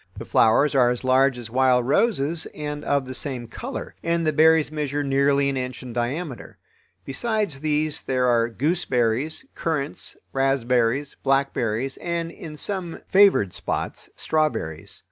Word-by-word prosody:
The - - -7
flowers 130 +7 +3
are 125 -3 +4
as 125 +1 -2
large 130 0 +3
as 115 -2 -8
wild 125 -1 +3
roses 160 - +1
and 150 -1 -5
of 140 -2 0
the 130 - -6
same 130 -3 -4
color, - - -6
and 170 0 0
the 155 - +1
berries 160 0 +4
measure 145 -1 -2
nearly 140 0 +2
an 135 -1 -1
inch 125 -1 -4
in 125 -2 -8
diameter. 125 +4 -4 0.5
Besides 205 - -2
these 155 0 0
there 130 -1 0
are 120 -1 +3
gooseberries, 130 - 0
currants, 155 -3 -3 0.2
raspberries, 135 0 +1
blackberries, 135 -2 0
and, 170 -1 -3
in 155 -3 -9
some 185 -1 -4
favored 195 - +5
spots, - - -4
strawberries. 150 - -2
140 Hz, 145 wpm, -23 LUFS, 125-155 Hz, 0.5 s, favored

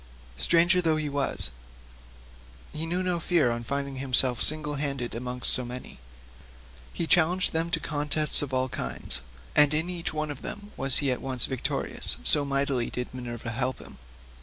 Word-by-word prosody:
Stranger 170 - +3
though 160 -2 +1
he 155 -1 -3
was, 140 - +2 1.2
he 160 +2 -4
knew 180 +2 -2
no 180 -2 -1
fear 165 -7 +1
on 115 0 -4
finding 140 +2 -4
himself 130 -2 +1
single 150 -1 -1
handed 135 -4 -4
among 125 +1 -7
so 130 - +4
many, 125 - -9 1.0
but 165 - -2
challenged 175 +3 +2
them 165 +1 -1
to 165 - -1
contests 150 0 +5
of 145 -2 -5
all 130 0 -1
kinds, 125 - -1 0.3
and 150 0 +6
in 160 +4 -1
each 170 -2 -3
one 155 -1 -3
of 140 - -10
them 205 0 -9
was 135 +1 +3
at 130 -3 -2
once 130 -3 +2
victorious, 130 -3 -3
so 65 - +7
mightily 140 -3 -1
did 125 0 -6
Minerva 120 -2 -7
help 130 +3 -2
him. - - -14
140 Hz, 165 wpm, -26 LUFS, 125-160 Hz, 1.2 s, so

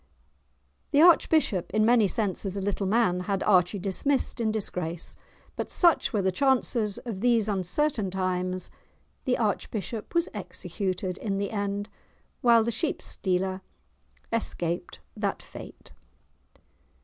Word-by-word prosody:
The 290 - +4
archbishop, 310 - +4
in 215 0 +4
many 230 -3 +5
senses 195 -1 -2
a - - -1
little 195 0 -1
man, 200 -4 +2
had 195 +1 -1
Archie 185 -1 +3
dismissed 235 +7 0
in 220 -1 +1
disgrace. 180 -5 -3 0.4
But, - - -4
such 340 -6 +3
were 210 -5 0
the 190 - +2
chances 240 -3 +1
of 215 -6 -5
these 235 -3 +3
uncertain 205 - 0
times, 185 0 -2 0.5
the 255 -2 +2
archbishop 215 - -3
was 340 +1 +3
executed 185 -2 -4
in 195 -3 -2
the 200 0 -2
end, 205 -1 -2 0.5
while 235 -2 +6
the 235 - -1
sheepstealer 190 - -1 0.7
escaped 175 -6 -2
that - - -2
fate! - - -11
205 Hz, 125 wpm, -27 LUFS, 185-235 Hz, 0.7 s, while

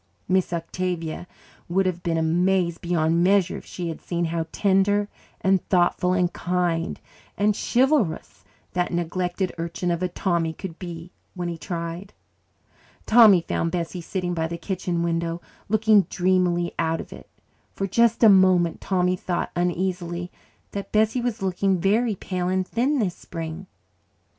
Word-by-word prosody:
Miss 185 -1 +1
Octavia 170 0 -3 0.4
would 190 +2 +2
have 180 -1 -1
been 165 -1 -1
amazed 170 +1 +1
beyond 170 -1 +1
measure 190 -1 +3
if - - -12
she 175 -2 -5
had 160 - -6
seen 170 -1 -2
how 165 0 -2
tender 205 +1 +2 0.3
and 190 -1 +2
thoughtful 180 0 +2
and 180 -1 +1
kind 175 -2 -1 0.4
and 205 0 +2
chivalrous 245 - +1 0.3
that 180 0 0
neglected 175 +2 -2
urchin 170 +1 -2
of 170 0 -1
a 185 - +1
Tommy 170 -2 -1
could 170 -1 -8
be 175 -1 -8 0.2
when 175 -1 -3
he 170 - -5
tried. 170 +2 -5 0.9
Tommy 215 -6 +7
found 165 0 -1
Bessie 175 +1 -3
sitting 180 +1 -3
by 160 -1 -1
the 170 +1 -5
kitchen 175 -1 -2
window, 170 0 -1 0.3
looking 215 -1 +4
dreamily 180 -1 +1
out 165 0 0
of - - -8
it. - - -13 0.5
For 195 - -1
just 235 +4 +2
a - - +9
moment 185 -4 +4
Tommy 180 -1 +1
thought 180 -1 -3
uneasily 175 0 -2 0.4
that 200 -1 -6
Bessie 220 +3 +2
was 235 -3 -2
looking 190 0 +1
very 215 +4 +2
pale 180 -1 -3
and 185 0 0
thin 265 +6 +1
this 200 -8 0
spring. 165 +2 -7
180 Hz, 150 wpm, -24 LUFS, 170-195 Hz, 0.9 s, a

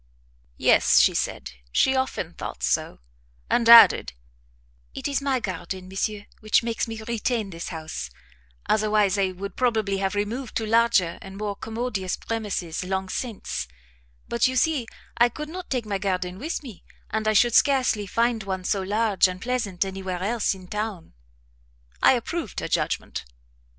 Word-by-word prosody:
"Yes," - - +5
she - - +5
said, - - -2 0.2
"she 265 - +3
often 260 -10 -2
thought - - -7
so;" - - 0 0.5
and 230 -1 +3
added, 230 - +8 0.8
"it - - -3
is 280 -1 -1
my 275 -2 +1
garden, 185 -2 -5
monsieur, 205 +2 -3
which 215 +2 +2
makes 230 0 -2
me 225 -1 -6
retain 230 -2 -2
this 170 0 -6
house, 155 - -6 0.6
otherwise 210 -2 +2
I 190 -1 +1
should 195 +2 -7
probably 220 -6 +1
have 195 +1 -1
removed 220 +5 -3
to 225 - -1
larger 225 -6 +3
and 195 0 -10
more 205 -1 -3
commodious 220 -4 -3
premises 205 -7 -3
long 190 0 -2
since; 225 - -4 0.6
but 235 - +2
you 260 - -2
see 275 -3 +1 0.3
I 240 +1 +6
could 300 +5 -7
not 365 +2 -7
take 250 -4 -1
my 200 -2 -2
garden 185 -1 -2
with 305 +4 -4
me, 235 -9 -11 0.3
and 215 0 -1
I 215 - +3
should 235 +2 +4
scarcely 255 -7 +3
find 230 +2 +1
one 190 -2 -4
so 195 +1 0
large 205 0 +2
and 185 0 -6
pleasant 215 -5 -1
anywhere 190 -1 -4
else 220 -1 0
in 185 -1 -13
town." 210 -4 -4 0.9
I - - +7
approved - - -3
her - - -3
judgment. - - -2
210 Hz, 160 wpm, -25 LUFS, 190-235 Hz, 0.9 s, added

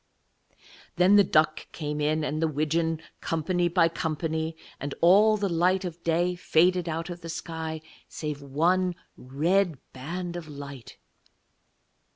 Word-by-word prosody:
Then 180 +4 +5
the 205 - +7
duck 155 -3 +1
came 150 -1 -3
in, 155 +1 +1
and 150 +1 -2
the 165 - +3
widgeon, 160 +2 -1 0.2
company 175 +2 0
by 170 -1 +3
company: 160 0 -3 0.2
and 140 0 -4
all 210 +5 +6
the 205 -1 0
light 180 +2 +1
of 170 -1 -6
day 170 +2 +1
faded 180 0 +2
out 165 +2 -3
of 175 0 -8
the 165 - -8
sky 160 -1 -5 0.3
saving 145 -3 -6
one 180 +5 +2 0.2
red 165 +6 0 0.2
band 175 +7 -5
of 170 -3 -6
light. 140 -4 -9
165 Hz, 140 wpm, -27 LUFS, 155-180 Hz, 0.3 s, the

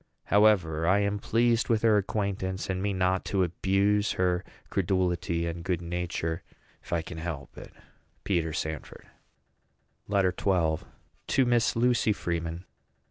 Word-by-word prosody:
However, 90 -7 +4
I 100 +3 +4
am 100 0 0
pleased 115 +2 +2
with 115 -2 +2
her 110 -2 +5
acquaintance, 95 -2 -1
and 95 0 -2
mean 100 -1 -1
not 95 0 +1
to 95 -2 +1
abuse 100 +4 +1
her 90 -1 +1 0.3
credulity 90 -3 0
and 85 0 -4
good 90 -2 -1
nature, 85 -1 -3 0.4
if - - -15
I 85 -2 0
can 80 -1 -8
help 80 -4 -6
it. - - -11 0.5
PETER 85 -5 0
SANFORD. 80 -2 -5 1.0
LETTER 100 -3 +2
XII. 85 -6 0 0.4
TO 135 - +3
MISS 120 0 +2
LUCY 120 -2 +3
FREEMAN. 85 -1 -3
95 Hz, 135 wpm, -28 LUFS, 85-105 Hz, 1.0 s, her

